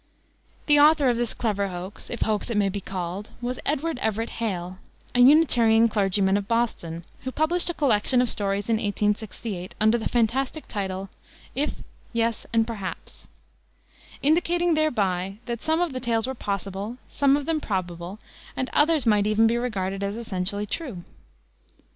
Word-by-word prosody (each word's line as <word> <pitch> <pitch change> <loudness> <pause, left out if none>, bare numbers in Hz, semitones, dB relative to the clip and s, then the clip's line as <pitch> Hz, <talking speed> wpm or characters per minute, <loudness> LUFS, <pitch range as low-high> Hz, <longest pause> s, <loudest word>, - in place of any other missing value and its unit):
The 295 -1 +5
author 295 -2 +6
of 240 - +1
this 240 -1 -2
clever 205 -4 0
hoax 185 +2 -8
if 235 - -5
hoax 215 +1 0
it 230 - -1
may 200 -1 +3
be 200 +1 -4
called 185 +2 -5
was 245 +1 -3
Edward 300 0 0
Everett 220 0 -1
Hale, 185 -5 -4 0.3
a 245 - +1
Unitarian 245 -5 +6
clergyman 195 -2 +2
of 200 -1 -4
Boston, 220 -8 -1 0.2
who 260 - -5
published 335 +5 +1
a - - -1
collection 250 -2 +3
of 250 - +3
stories 200 -2 0
in 225 -1 +2
1868, 210 -2 -2
under 220 +2 +4
the 220 - -2
fantastic 255 +6 0
title, 195 -2 -4 0.4
If, 290 +3 -2 0.3
Yes, 230 -1 -1
and 225 -1 +3
Perhaps, 210 -5 -7 1.0
indicating 345 +3 +3
thereby 195 - 0
that 235 -1 -4
some 320 +1 +1
of 350 -5 0
the 255 - -3
tales 230 -2 0
were 265 - -3
possible, 200 0 -4
some 280 0 +3
of 290 - -4
them 320 -1 0
probable, 180 -2 -4 0.4
and 260 - -2
others 305 -2 +4
might 210 -2 +3
even 215 +1 +4
be 225 +1 +3
regarded 195 -5 -2
as 200 +1 -2
essentially 205 -2 -2
true. 215 - -5
225 Hz, 160 wpm, -25 LUFS, 200-260 Hz, 1.0 s, author